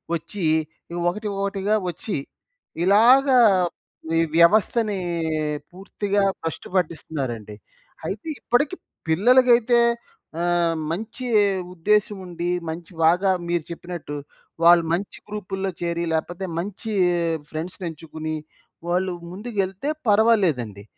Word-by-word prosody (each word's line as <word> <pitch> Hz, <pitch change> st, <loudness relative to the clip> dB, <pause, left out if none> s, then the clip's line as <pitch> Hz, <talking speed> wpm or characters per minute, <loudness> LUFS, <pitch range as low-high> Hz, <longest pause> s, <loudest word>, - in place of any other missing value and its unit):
ఒచ్చి, 180 Hz, +4 st, -6 dB, 0.5 s
ఈ -, -, -6 dB, 0.2 s
ఒకటి, 210 Hz, +4 st, -4 dB
ఒకటిగా 200 Hz, +1 st, 0 dB
వచ్చి 175 Hz, +5 st, -4 dB, 0.7 s
ఇలాగ 235 Hz, +8 st, +6 dB, 0.9 s
ఈ -, -, +4 dB, 0.2 s
వ్యవస్థని 210 Hz, +4 st, +4 dB, 0.7 s
పూర్తిగా 200 Hz, +2 st, -2 dB, 0.2 s
బష్టు 165 Hz, -1 st, -4 dB
పట్టిస్తున్నారండి. 135 Hz, -, -2 dB, 0.5 s
అయితే 205 Hz, +10 st, -5 dB
ఇప్పటికి 280 Hz, +8 st, +1 dB, 0.3 s
పిల్లలకైతే 240 Hz, +6 st, +5 dB, 0.6 s
ఆహ్, 175 Hz, -1 st, +2 dB, 0.2 s
మంచి 225 Hz, +8 st, -5 dB, 0.5 s
ఉద్దేశం 210 Hz, +4 st, +1 dB
ఉండి, 175 Hz, 0 st, -4 dB, 0.2 s
మంచి 165 Hz, +2 st, -7 dB
బాగా 180 Hz, +4 st, +4 dB, 0.2 s
మీరు 170 Hz, -1 st, 0 dB
చెప్పినట్టు 170 Hz, -3 st, -6 dB, 0.5 s
వాళ్ళు 170 Hz, 0 st, +7 dB
మంచి 190 Hz, +4 st, -3 dB
గ్రూపుల్లో 195 Hz, -2 st, -4 dB
చేరి, 170 Hz, 0 st, -1 dB
లేపోతే 175 Hz, +4 st, -2 dB
మంచి 205 Hz, +4 st, -5 dB, 0.6 s
ఫ్రెండ్స్‌నెంచుకొని, 160 Hz, -1 st, -5 dB, 0.5 s
వాళ్ళు 180 Hz, +1 st, +1 dB, 0.2 s
ముందుకెళ్తే 200 Hz, +3 st, -3 dB, 0.2 s
పర్వాలేదండి. 185 Hz, -, +3 dB
185 Hz, 90 wpm, -23 LUFS, 170-210 Hz, 0.9 s, వాళ్ళు